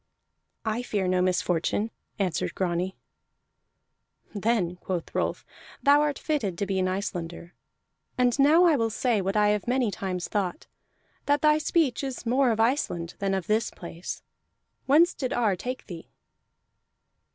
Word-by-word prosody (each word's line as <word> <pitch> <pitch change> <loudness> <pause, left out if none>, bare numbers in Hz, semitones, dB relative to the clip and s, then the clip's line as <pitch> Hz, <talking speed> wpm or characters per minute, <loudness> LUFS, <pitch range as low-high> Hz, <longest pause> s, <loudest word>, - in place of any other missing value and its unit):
"I 220 +2 0
fear 205 -6 -1
no 180 0 +2
misfortune," 180 +3 0 0.3
answered 190 -4 -1
Grani. 180 0 -1 1.4
"Then," 205 -4 0
quoth 180 -2 -4
Rolf, - - -1 0.4
"thou 285 +1 +6
art 295 -2 0
fitted 220 - -2
to 200 - -1
be 190 -1 -1
an 185 - +1
Icelander. 175 -3 -4 0.6
And 250 +1 +2
now 305 +5 +6
I 335 -4 +5
will 230 -4 +1
say 225 -1 +1
what 195 +3 -1
I 210 0 +4
have 210 +1 0
many 250 -3 +1
times 185 -1 -3
thought: 195 -4 -2 0.6
that 290 0 +2
thy 305 0 +5
speech 305 -5 +1
is 265 -3 -5
more 255 +2 +3
of 225 -1 0
Iceland 225 - 0
than 195 -1 0
of 190 -3 -2
this 215 +3 +1
place. 170 0 -7 0.6
Whence 320 +6 +5
did 255 -3 -3
Ar 220 -5 +2
take 250 +7 -5
thee?" 170 -4 -9
210 Hz, 150 wpm, -27 LUFS, 185-255 Hz, 1.4 s, thou